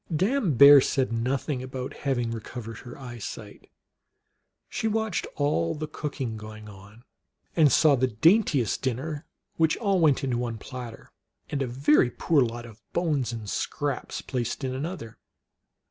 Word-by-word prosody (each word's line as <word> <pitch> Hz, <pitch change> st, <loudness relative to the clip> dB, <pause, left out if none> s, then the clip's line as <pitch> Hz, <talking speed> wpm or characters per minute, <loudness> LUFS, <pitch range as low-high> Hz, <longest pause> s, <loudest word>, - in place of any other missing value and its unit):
Dame 190 Hz, -, +1 dB
Bear 140 Hz, +3 st, +10 dB
said 130 Hz, -2 st, 0 dB
nothing 125 Hz, +3 st, -1 dB
about 130 Hz, 0 st, -6 dB
her -, -, -14 dB
having 120 Hz, -5 st, -1 dB
recov 115 Hz, +2 st, -6 dB
ered 115 Hz, 0 st, -8 dB
her 120 Hz, -1 st, -10 dB
eyesight. 120 Hz, -5 st, -8 dB, 1.0 s
She 225 Hz, -, -2 dB
watched 220 Hz, -3 st, -1 dB
all 145 Hz, -, 0 dB
the 155 Hz, 0 st, -4 dB
cooking 140 Hz, -7 st, -4 dB
going 110 Hz, 0 st, -10 dB
on, 100 Hz, +3 st, -14 dB, 0.5 s
and 155 Hz, -5 st, +5 dB
saw 150 Hz, +4 st, +5 dB
the 130 Hz, 0 st, +2 dB
daintiest 145 Hz, -, +3 dB
dinner, 140 Hz, +4 st, -3 dB, 0.3 s
which 160 Hz, -1 st, +3 dB
all 200 Hz, -4 st, +1 dB
went 150 Hz, -6 st, +3 dB
into 125 Hz, -3 st, 0 dB
one 120 Hz, -2 st, -3 dB
platter, 120 Hz, 0 st, -9 dB, 0.4 s
and 140 Hz, -, -1 dB
a 135 Hz, -, 0 dB
very 135 Hz, +1 st, +3 dB
poor 150 Hz, +3 st, +2 dB
lot 120 Hz, -1 st, -2 dB
of 115 Hz, -2 st, -14 dB
bones 150 Hz, -8 st, 0 dB
and 115 Hz, -3 st, -6 dB
scraps 145 Hz, +6 st, -3 dB
placed 125 Hz, +1 st, -3 dB
in 130 Hz, -1 st, -2 dB
another. 135 Hz, -4 st, -6 dB
130 Hz, 155 wpm, -26 LUFS, 115-150 Hz, 1.0 s, Bear